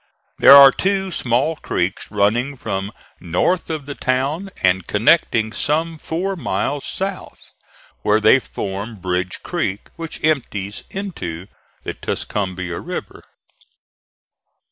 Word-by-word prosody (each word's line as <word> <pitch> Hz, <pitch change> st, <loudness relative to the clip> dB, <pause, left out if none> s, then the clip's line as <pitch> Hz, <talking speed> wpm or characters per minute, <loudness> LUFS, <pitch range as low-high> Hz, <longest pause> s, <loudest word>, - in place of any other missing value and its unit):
There 140 Hz, -, +10 dB
are 140 Hz, -1 st, +10 dB
two 195 Hz, +4 st, -1 dB
small 135 Hz, +3 st, 0 dB
creeks 90 Hz, -, -2 dB
running 115 Hz, +7 st, +1 dB
from 95 Hz, -2 st, -3 dB, 0.3 s
north 90 Hz, -, 0 dB
of 155 Hz, -3 st, -4 dB
the 145 Hz, -, -5 dB
town 140 Hz, +9 st, -1 dB
and 95 Hz, -1 st, +2 dB
connecting 110 Hz, -1 st, +3 dB
some 160 Hz, +6 st, -1 dB
four 185 Hz, +6 st, -2 dB
miles 145 Hz, -4 st, -2 dB
south, 195 Hz, 0 st, -5 dB, 0.5 s
where 105 Hz, +1 st, +3 dB
they 110 Hz, +5 st, +6 dB
form 100 Hz, -1 st, -5 dB
Bridge 90 Hz, -1 st, -3 dB
Creek 95 Hz, +2 st, -3 dB
which 165 Hz, -1 st, -7 dB
empties 105 Hz, -10 st, -1 dB
into 130 Hz, -, -5 dB, 0.4 s
the -, -, -4 dB
Tuscumbia 95 Hz, -4 st, -3 dB
River. -, -, -7 dB
125 Hz, 115 wpm, -20 LUFS, 95-160 Hz, 0.5 s, There